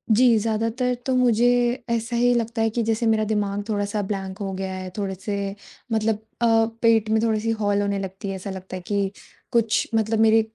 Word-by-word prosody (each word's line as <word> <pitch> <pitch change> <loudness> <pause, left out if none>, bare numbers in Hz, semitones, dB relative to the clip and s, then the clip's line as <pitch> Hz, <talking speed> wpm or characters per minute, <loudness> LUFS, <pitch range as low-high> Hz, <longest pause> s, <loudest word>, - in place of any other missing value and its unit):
जी, 240 -1 +5
ज़्यादातर 230 +3 0
तो 265 - +1
मुझे 245 -1 +4 0.4
ऐसा 230 0 -1
ही 245 +1 +4
लगता 230 -1 -1
है 225 - +3
कि 230 +1 -1
जैसे 225 +1 +1
मेरा 220 -1 +3
दिमाग़ 205 -1 0
थोड़ा-सा 205 0 -1
ब्लैंक 195 -1 -4
हो 195 -2 -3
गया 190 0 -4
है, 185 0 -5
थोड़े-से 200 0 -3 0.4
मतलब 220 -1 +1 0.2
अ, 235 - +4 0.4
पेट 225 -2 +4
में 220 0 +3
थोड़ी 220 -2 +2
सी 225 +1 -1
हॉल 205 0 +2
होने 200 -1 -1
लगती 195 +1 -6
है, 195 - -3
ऐसा 190 +1 -6
लगता 190 0 -7
है 185 - -6
कि 200 -1 0 0.4
कुछ 230 -3 +2
मतलब 220 0 +1
मेरे 225 0 +5
215 Hz, 200 wpm, -23 LUFS, 200-230 Hz, 0.4 s, जी